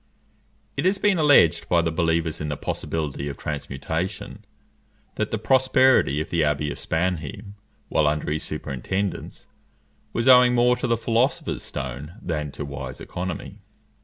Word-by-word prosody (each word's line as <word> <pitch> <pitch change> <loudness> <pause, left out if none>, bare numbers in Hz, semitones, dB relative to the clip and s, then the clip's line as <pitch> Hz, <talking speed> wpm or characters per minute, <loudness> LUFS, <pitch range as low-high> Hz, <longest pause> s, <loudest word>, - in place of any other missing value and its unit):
It - - -1
has 190 +2 +3
been 195 -3 +2
alleged 145 - +5
by 85 -1 +3
the 80 - 0
believers 80 -1 0
in 75 - -3
the 75 - -3
possibility 75 -3 -3
of 70 - -7
transmutation, 75 +4 -4 0.7
that - - -2
the 110 - -1
prosperity 130 - +4
of 80 - -4
the 85 -2 +2
abbey 75 0 0
of - - -6
Spannheim, 90 +3 -2 0.3
while 75 - +2
under 75 0 -1
his 80 +1 -1
superintendence, 75 +7 -4 0.7
was 115 +2 -1
owing 125 -1 +7
more 125 +1 +4
to - - -2
the 115 -1 +2
philosopher's 115 +3 0
stone 70 +4 -6
than 75 -8 -3
to 75 - -5
wise 70 0 -7
economy. 95 +3 -6
85 Hz, 150 wpm, -24 LUFS, 75-115 Hz, 0.7 s, owing